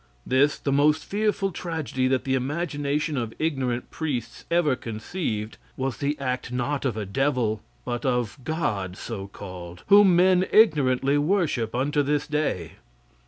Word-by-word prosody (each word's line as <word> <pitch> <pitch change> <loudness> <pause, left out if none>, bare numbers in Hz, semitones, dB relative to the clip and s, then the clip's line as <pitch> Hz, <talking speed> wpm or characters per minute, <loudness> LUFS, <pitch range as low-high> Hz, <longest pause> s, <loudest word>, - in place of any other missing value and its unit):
This, 140 +3 +3
the 140 - -2
most 150 +2 +3
fearful 205 -1 0
tragedy 160 -7 -2
that 130 0 +1
the 130 - -1
imagination 145 +1 -1
of 115 -2 -3
ignorant 130 -6 -1
priests 125 -8 -4
ever 170 -5 +3
conceived, 110 - -4 0.2
was 130 -2 -2
the 145 +1 -1
act 130 -2 -3
not 130 +3 -1
of 120 -5 -1
a 105 - -2
devil, 120 -1 0 0.2
but 120 -1 -3
of 125 -1 -1
God 105 - -2
so 100 -4 -6
called, 90 -3 -9
whom 200 -3 +7
men 185 +1 +4
ignorantly 145 - +4
worship 145 - 0
unto 145 +4 +1
this 145 +1 0
day. 150 - -2
135 Hz, 145 wpm, -25 LUFS, 120-155 Hz, 0.2 s, whom